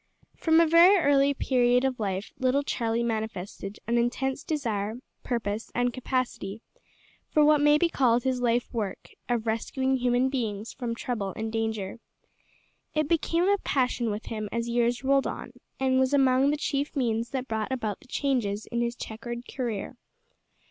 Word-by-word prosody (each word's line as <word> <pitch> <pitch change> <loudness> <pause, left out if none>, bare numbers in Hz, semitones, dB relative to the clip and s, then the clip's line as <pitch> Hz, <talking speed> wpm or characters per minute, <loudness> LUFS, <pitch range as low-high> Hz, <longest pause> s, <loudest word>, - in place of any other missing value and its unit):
From 320 0 +3
a 335 - +6
very 340 +5 +7
early 285 -4 +4
period 250 -1 +2
of 260 -2 -1
life 195 -1 -3
little 260 +2 +2
Charlie 230 -3 -1
manifested 215 -3 -4
an 235 +1 +1
intense 260 +3 -1
desire, 220 -9 -2 0.3
purpose, 225 -3 -3
and 245 0 +1
capacity 250 -5 -3 0.7
for 300 -1 +4
what 300 -1 +5
may 295 0 +6
be 345 - +3
called 245 -6 +2
his 255 -1 0
life 240 +1 +1
work 210 -5 -4 0.2
of 235 -2 0
rescuing 260 +4 0
human 250 +1 +2
beings 225 -5 -3
from 235 -3 -4
trouble 220 -5 -3
and 220 0 -3
danger. 220 -2 -2 1.0
It 305 -1 +1
became 335 +2 +1
a 405 0 +3
passion 250 -6 0
with 210 +1 -4
him 215 -2 -4
as 235 0 -2
years 240 +1 +1
rolled 275 0 +3
on, - - -6 0.3
and 260 0 +2
was 260 +2 +3
among 265 0 +4
the 295 - +1
chief 290 +1 -2
means 230 -3 0
that 265 -1 -3
brought 220 0 -2
about 225 -6 -2
the - - -20
changes 240 -7 -1
in 235 0 0
his 235 0 -1
chequered 235 +2 -7
career. 240 -2 -4
245 Hz, 165 wpm, -27 LUFS, 225-270 Hz, 1.0 s, very